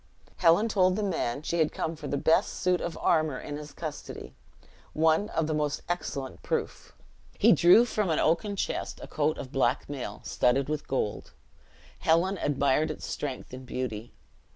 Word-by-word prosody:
Helen 175 +5 +4
told 185 -4 +3
the 215 - -1
man 150 -8 -2
she 165 +1 +2
came 165 - -3
for 150 -2 -8
the 140 - -1
best 160 +3 +2
suit 180 -1 +1
of 170 - -4
armor 155 -4 +1
in 145 - -6
his 150 0 -8
custody 150 - -7 0.6
"one 160 +6 +2
of 165 - 0
the 155 - -1
most 150 -1 -1
excellent 140 -6 -4
proof." - - -4 0.4
He - - +6
drew 180 +8 +7
from 210 -5 -1
an 160 - +1
oaken 170 +6 +1
chest - - -3
a - - -7
coat 155 0 0
of 130 - -7
black 135 - +1
mail, 140 -3 -6
studded 130 +3 +1
with 155 -1 -3
gold. 120 -6 -2 0.7
Helen 175 +4 +2
admired 140 +2 +1
its 155 - -6
strength 135 -3 -5
and 130 +1 -7
beauty. 120 -3 -5
155 Hz, 170 wpm, -28 LUFS, 140-170 Hz, 0.7 s, drew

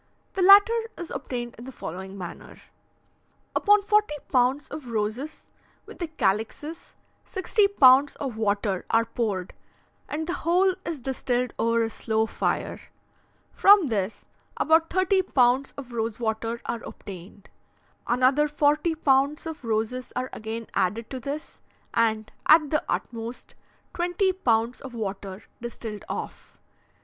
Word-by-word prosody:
The 385 - -2
latter 400 +4 +8 0.2
is 345 - -7
obtained 245 -3 -4
in 235 - -9
the 265 - -7
following 190 -2 -7
manner: 180 -3 -9 1.0
Upon 415 0 +4
forty 420 -6 +2 0.2
pounds 260 +2 +2
of 295 -5 -7
roses, 230 +7 -3 0.4
with - - -12
the 345 - -2
calixes, 265 - -2 0.3
sixty 400 +2 +1
pounds 275 -7 +6
of 265 -5 -4
water 205 -3 0
are 230 0 +3
poured, 205 -7 -3 0.6
and 315 +2 -3
the 345 - -2
whole 365 +3 +3
is 325 -4 -3
distilled 250 -1 -1
over 230 0 +2
a 225 - -1
slow 220 0 0
fire. - - -2 0.7
From 400 -2 +7
this, 210 -5 -2 0.3
about 320 +1 +3
thirty 375 +1 +2
pounds 260 -5 +2
of 255 -3 -8
rose 225 -1 -2
water 225 0 -2
are 235 - -3
obtained. 195 +1 -10 0.6
Another 260 +5 +3
forty 300 +2 +2
pounds 280 0 +2
of 320 -4 -6
roses 225 +3 -2
are 255 +1 -3
again 225 +1 -5
added 220 +5 -1
to 260 - -4
this, 280 +5 -6 0.3
and, 220 -2 +1 0.2
at 310 -2 +6
the 305 - +1
utmost, 230 +1 -4 0.4
twenty 355 +2 +1
pounds 235 -8 0
of 260 -3 -9
water 195 -2 -5 0.2
distilled 225 -3 -6
off. - - -6
250 Hz, 135 wpm, -26 LUFS, 225-310 Hz, 1.0 s, latter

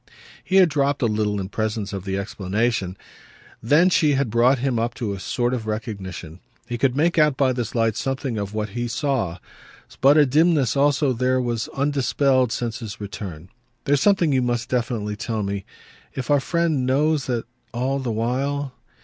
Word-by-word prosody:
He 190 - -2
had 190 -2 +7
dropped 145 -2 0
a - - +4
little 105 -2 0
in 95 -1 -4
presence 110 -1 -3
of 95 -1 -5
the 95 0 -2
explanation; 100 0 -2 0.6
then 155 +10 +4
she 150 -4 +3
had 135 -4 0
brought 120 +4 +4
him 130 -2 0
up 115 +1 -2
to 105 -4 -3
a 100 - -6
sort 120 +5 -1
of 115 -4 -3
recognition. 95 -6 -5 0.3
He 120 -1 -4
could 130 +1 +1
make 170 +2 +2
out 150 -3 +3
by 130 -2 +2
this 120 -2 -4
light 115 -2 +2
something 135 -4 -2
of 100 -1 -4
what 105 0 -2
he 120 +4 -3
saw, 120 - -1 0.6
but 140 +3 +6
a 150 - +6
dimness 150 -2 +3
also 140 -1 +2
there 130 +2 +1
was, 120 -3 -2
undispelled 135 -2 +1
since 115 -1 -3
his 110 -4 -7
return. 95 -5 -7 0.4
"There's 140 0 +2
something 185 -7 +3
you 130 - +3
must 120 -1 -1
definitely 115 -4 -2
tell 110 0 -3
me. 100 0 -3 0.5
If 130 +1 -3
our 145 - +5
friend 165 -1 0
knows 145 +2 +1
that 120 -3 -1 0.3
all 130 +3 -1
the 130 -3 -3
while 130 +5 -1
125 Hz, 185 wpm, -23 LUFS, 110-140 Hz, 0.6 s, had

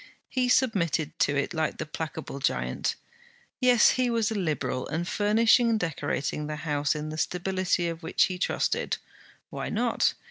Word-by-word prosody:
He 255 -1 0
submitted 170 - +1
to 145 - +2
it 140 - -1
like 160 -2 -1
the 155 - -3
placable 155 -2 -6
giant. 140 - -1 0.6
Yes, 250 -3 +6
he 255 -1 +1
was 230 -2 +1
a - - 0
Liberal, 155 - -2
and 170 +3 -2
furnishing 220 +4 +4
and 225 -1 +2
decorating 150 -3 -2
the 150 - -3
house 150 -1 -1
in 150 0 -4
the 155 +1 -5
stability 180 0 0
of 165 0 -5
which 165 - +2
he 185 -1 -1
trusted. - - 0 0.5
Why - - -4
not? - - +1
170 Hz, 165 wpm, -27 LUFS, 155-215 Hz, 0.6 s, Yes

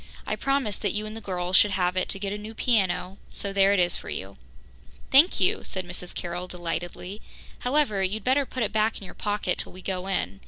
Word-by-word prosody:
I - - -1
promised 275 -7 0
that 205 - 0
you 210 +1 -1
and 215 +1 -7
the 225 - -6
girls 180 -2 -1
should 210 - +7
have 180 -2 +1
it 185 - 0
to - - -1
get 195 0 -3
a - - -3
new 215 +2 -8
piano, 195 -5 +1
so 200 -1 -4
there 195 0 +5
it 200 - +4
is 175 -1 +3
for - - -6
you." 95 +1 -5 0.8
"Thank 290 +7 +7
you," 185 - +2
said 185 -1 -3
Mrs. 180 0 -6
Carroll 175 +1 -4
delightedly. 175 +3 -4 0.4
"However, 250 -6 +2
you'd 195 +3 0
better 265 +2 +3
put 255 - -2
it 210 - -2
back 220 +1 +2
in - - -10
your - - -10
pocket 205 -3 -1
till - - -3
we 185 0 -10
go 185 -1 -2
in. 100 - -1
195 Hz, 230 wpm, -27 LUFS, 180-215 Hz, 0.8 s, should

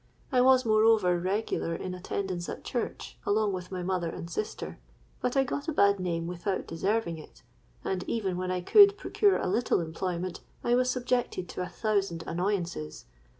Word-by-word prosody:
I 255 -2 +4
was 260 0 +5
moreover 215 -5 +4
regular 185 -2 -1
in 185 +1 -5
attendance 180 -1 -3
at - - -6
church, 240 - -4
along 210 -1 +1
with 180 0 -6
my 180 -1 -3
mother 180 -2 -1
and 165 - -6
sister. 210 +6 -5 0.4
But 250 +2 0
I 270 - +5
got 285 +3 -4
a - - +1
bad 200 -7 +4
name 170 -2 -2
without 180 +3 -2
deserving 170 0 -1
it; - - -15 0.4
and 185 -1 -2
even 200 -6 -1
when 185 0 -3
I 185 0 -1
could 405 - +7
procure 405 -1 +2
a - - -2
little 225 +6 +1
employment, 175 +2 -3 0.2
I 240 - +2
was 250 +1 +3
subjected 245 -7 -1
to - - -5
a 180 - -3
thousand 195 -6 -1
annoyances. 175 - -2
190 Hz, 175 wpm, -29 LUFS, 175-225 Hz, 0.4 s, could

